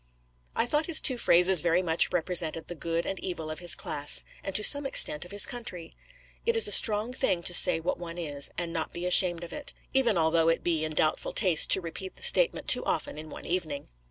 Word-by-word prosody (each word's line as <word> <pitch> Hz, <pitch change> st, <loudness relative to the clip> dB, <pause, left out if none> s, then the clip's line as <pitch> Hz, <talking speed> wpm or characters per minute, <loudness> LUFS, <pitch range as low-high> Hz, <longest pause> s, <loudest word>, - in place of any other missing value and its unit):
I -, -, 0 dB
thought 300 Hz, +5 st, -2 dB
his 335 Hz, -, +3 dB
two 255 Hz, -4 st, +1 dB
phrases 180 Hz, -2 st, +4 dB
very 175 Hz, +1 st, -1 dB
much 165 Hz, -1 st, +1 dB
represented 165 Hz, -2 st, -2 dB
the -, -, -8 dB
good 165 Hz, 0 st, -5 dB
and 195 Hz, -, -6 dB
evil 160 Hz, -4 st, -7 dB
of 155 Hz, -, -8 dB
his 175 Hz, -2 st, 0 dB
class, 145 Hz, 0 st, -1 dB, 0.2 s
and 195 Hz, -, -7 dB
to 210 Hz, -, +4 dB
some 285 Hz, +2 st, +5 dB
extent 150 Hz, -, +3 dB
of 180 Hz, -, -13 dB
his 205 Hz, 0 st, +4 dB
country. 185 Hz, -9 st, -8 dB, 0.5 s
It 465 Hz, 0 st, -1 dB
is 455 Hz, -, +4 dB
a -, -, -2 dB
strong 215 Hz, +2 st, +3 dB
thing 185 Hz, -8 st, -2 dB
to 175 Hz, -, 0 dB
say 165 Hz, -, +6 dB
what 165 Hz, -, -5 dB
one 170 Hz, -1 st, -9 dB
is, 145 Hz, -5 st, -2 dB
and 170 Hz, -1 st, -5 dB
not 160 Hz, -2 st, -5 dB
be 175 Hz, +1 st, -7 dB
ashamed 180 Hz, -1 st, +1 dB
of 170 Hz, -, -11 dB
it; 295 Hz, -, -9 dB, 0.2 s
even 255 Hz, -7 st, 0 dB
although 165 Hz, 0 st, 0 dB
it 165 Hz, -, -2 dB
be 165 Hz, -3 st, -2 dB
in 155 Hz, 0 st, -5 dB
doubtful 155 Hz, +1 st, -2 dB
taste 180 Hz, -7 st, +2 dB
to 190 Hz, -, +3 dB
repeat 185 Hz, +2 st, -8 dB
the -, -, -11 dB
statement 485 Hz, +1 st, +1 dB
too -, -, +4 dB
often -, -, -4 dB
in 155 Hz, 0 st, -11 dB
one -, -, -12 dB
evening. 160 Hz, -5 st, -6 dB
175 Hz, 230 wpm, -26 LUFS, 165-205 Hz, 0.5 s, say